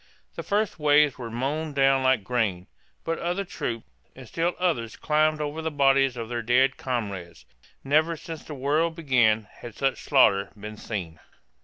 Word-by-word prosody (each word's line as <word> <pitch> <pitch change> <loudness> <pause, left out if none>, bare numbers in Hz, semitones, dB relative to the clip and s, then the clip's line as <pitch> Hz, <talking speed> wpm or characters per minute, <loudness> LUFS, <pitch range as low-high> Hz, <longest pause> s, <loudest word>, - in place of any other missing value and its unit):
The - - -5
first 205 -4 -1
waves 150 -2 +4
were 120 -2 -5
mown 145 +6 -3
down 135 -1 +3
like 130 -4 +2
grain; 100 -6 -1 0.4
but 165 0 -2
other 180 +3 -2
troops, 115 -9 -4 0.3
and 130 -2 -11
still 170 +7 -1
others 145 -11 -1
climbed 155 0 +1
over 150 +1 -3
the 160 - -2
bodies 135 -3 +3
of 115 -1 -4
their 120 0 -3
dead 125 +4 +3
comrades. 100 -9 -5 0.4
Never 155 +4 +2
since 160 0 -8
the 150 - -8
world 150 +5 0
began 120 -9 +2
had 120 -3 -9
such 135 -1 -1
slaughter 100 -8 +3
been 105 +1 -7
seen. 90 -9 -6
135 Hz, 165 wpm, -26 LUFS, 115-155 Hz, 0.4 s, waves